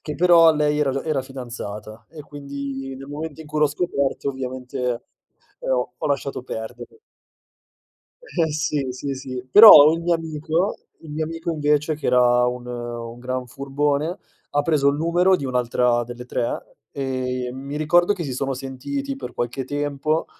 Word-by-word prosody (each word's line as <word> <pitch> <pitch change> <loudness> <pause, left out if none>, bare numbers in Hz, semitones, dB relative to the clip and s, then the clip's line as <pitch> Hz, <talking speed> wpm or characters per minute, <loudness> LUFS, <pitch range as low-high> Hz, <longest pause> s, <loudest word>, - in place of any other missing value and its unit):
che 150 - -5
però 165 0 +6
lei 150 0 +1
era 145 -2 +2
già 135 +1 -3
era 155 -4 0
fidanzata, 120 -5 -8
e 155 -2 -11
quindi 140 -2 -6
nel 135 +1 -10
momento 155 +2 -6
in - - -15
cui 150 +1 -3
l'ho 150 - +6
scoperto 140 -3 -1
ovviamente, 130 -1 -6 0.8
ehm, - - -4
ho 125 -1 0
ho - - -2
lasciato 140 -2 -2
perdere. 110 - -8 1.3
Eh, 165 - -1
sì, 150 -3 -1
sì, 135 +2 -4
sì. 130 -1 -6
Però, 200 - +11
il 165 - -2
mio 170 0 +1
amico 160 +3 -1 0.3
il 155 - -9
mio 155 +1 -2
amico 165 +1 -4
invece, 150 0 +1
che 150 - -5
era 125 0 +4
un 125 0 -3
un 120 -1 -6
gran 130 0 -4
furbone, 145 +5 -1 0.3
ha 145 0 +1
preso 145 -3 +2
il 140 - +1
numero 175 +4 +3
di 160 - -1
un'altra 125 -1 +1
delle 120 +1 -8
3, 120 -1 -4 0.2
e 130 -2 -3
mi 140 +3 -6
ricordo 175 +5 +3
che 190 - -5
si 140 -5 -4
sono 135 +1 -2
sentiti 135 +1 -5
per 125 -2 -8
qualche 120 +2 -3
tempo 145 +3 -1
140 Hz, 170 wpm, -22 LUFS, 125-155 Hz, 1.3 s, Però